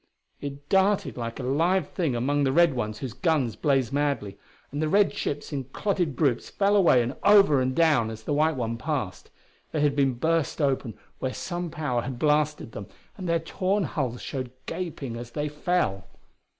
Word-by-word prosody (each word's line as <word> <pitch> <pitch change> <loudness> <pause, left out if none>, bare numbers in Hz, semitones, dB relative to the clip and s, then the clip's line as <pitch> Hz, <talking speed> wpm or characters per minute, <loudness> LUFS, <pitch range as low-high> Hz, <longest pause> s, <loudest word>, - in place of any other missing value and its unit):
It 140 0 -7
darted 195 +3 +2
like 115 0 -5
a - - -4
live 160 +6 +1
thing 160 -9 -1
among 140 +4 +1
the 135 - +2
red 170 +1 +5
ones 110 -4 -3
whose 130 -5 -5
guns 150 - +1
blazed 135 -4 +1
madly 140 -9 -1 0.4
and 145 +2 -3
the 155 - +1
red 200 +3 +4
ships 145 +1 -4
in 135 -2 -3
clotted 175 - -1
groups 130 -4 +1
fell 200 +1 +2
away 170 -11 +5
and 125 +3 -4
over 200 -9 +6
and 130 0 0
down 150 -9 +3
as 110 0 -8
the 145 - -2
white 155 +2 +2
one 115 -2 -3
passed. 135 - -3 0.4
They 155 - -1
had 145 -1 +2
been 135 -3 +2
burst 160 +4 0
open 135 -6 0 0.2
where 130 -1 -3
some 175 -1 -4
power 150 -7 -1
had 130 +1 -5
blasted 150 -3 +1
them, 100 -2 -7 0.3
and 185 -3 -5
their 170 - +3
torn 190 +5 -1
hulls 130 -7 -3
showed 130 -2 -4 0.2
gaping 160 -8 -5
as 120 0 -7
they 150 0 -1
fell. 150 - -1
145 Hz, 190 wpm, -26 LUFS, 125-165 Hz, 0.4 s, over